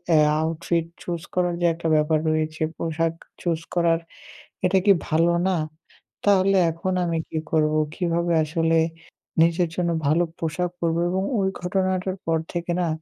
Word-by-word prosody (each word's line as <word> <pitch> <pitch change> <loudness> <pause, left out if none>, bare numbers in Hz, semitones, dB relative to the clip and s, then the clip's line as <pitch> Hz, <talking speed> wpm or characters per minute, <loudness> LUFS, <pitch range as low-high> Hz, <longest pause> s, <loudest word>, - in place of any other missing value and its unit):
এ - - +6 0.2
outfit 165 +1 -1 0.2
choose 170 -2 -3
করার 175 -1 +1
যে - - +2
একটা 165 0 -4
ব্যাপার 155 +1 +2
রয়েছে 155 0 -1 0.2
পোশাক 165 0 -1 0.3
চুজ 165 -2 0 0.2
করার 170 -1 +3 0.7
এটা 190 +1 +3
কি 205 - +7 0.2
ভালো 165 +2 +3
না? 190 - +2 0.7
তাহলে 195 -1 +4
এখন 185 +3 -3
আমি 165 -1 -1
কী 160 - -4
করবো? 155 -1 +2 0.2
কিভাবে 170 -1 0
আসলে 165 +1 +1 0.7
নিজের 170 +1 +2
জন্য 175 -1 0 0.2
ভালো 160 +4 +3 0.2
পোশাক 170 +2 -2
পরবো?" 165 0 0
এবং 190 +1 0 0.2
ওই 190 0 +2
ঘটনাটার 185 0 0
পর 165 0 +2 0.2
থেকে 175 0 -2
না? 170 - +1
170 Hz, 150 wpm, -24 LUFS, 160-180 Hz, 0.7 s, কি